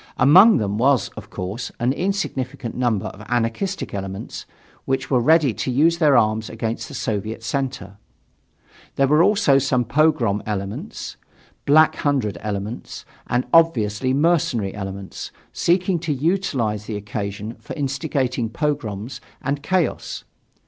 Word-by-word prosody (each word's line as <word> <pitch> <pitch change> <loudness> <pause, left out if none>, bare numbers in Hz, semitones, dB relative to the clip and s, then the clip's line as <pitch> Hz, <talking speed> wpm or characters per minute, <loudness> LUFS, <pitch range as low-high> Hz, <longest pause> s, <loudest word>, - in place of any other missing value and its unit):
Among 185 - +7
them 105 -1 -1
was, 130 0 +3
of - - -11
course, 100 +7 -5
an 120 +2 +1
insignificant 140 - -3
number 120 -6 0
of 100 - -7
anarchistic 120 - -1
elements, 95 -1 -6 0.4
which 135 0 -2
were 130 - +4
ready 150 0 +4
to 130 - -3
use 160 +7 +3
their 150 -5 +5
arms 110 -1 +1
against 115 0 -4
the - - -9
Soviet 110 +2 -3
center. 120 -7 -3 1.0
There 135 - +3
were 150 +4 +4
also 170 -8 +4
some 125 -2 +1
"pogrom" 130 -6 +2
elements, 100 -1 -5 0.5
black 155 +2 +5
hundred 135 -8 0
elements, 105 +2 -5 0.2
and 125 +1 0
obviously 130 -8 +3
mercenary 135 - +1
elements, 95 -1 -6 0.2
seeking 180 +1 +1
to 160 -1 -3
utilize 135 - 0
the 105 -1 -4
occasion 105 +1 -5
for 135 -3 -8
instigating 135 -4 -1
pogroms 120 -4 -3 0.2
and 140 +2 -2
chaos. 180 +2 -1
125 Hz, 130 wpm, -22 LUFS, 105-150 Hz, 1.0 s, Among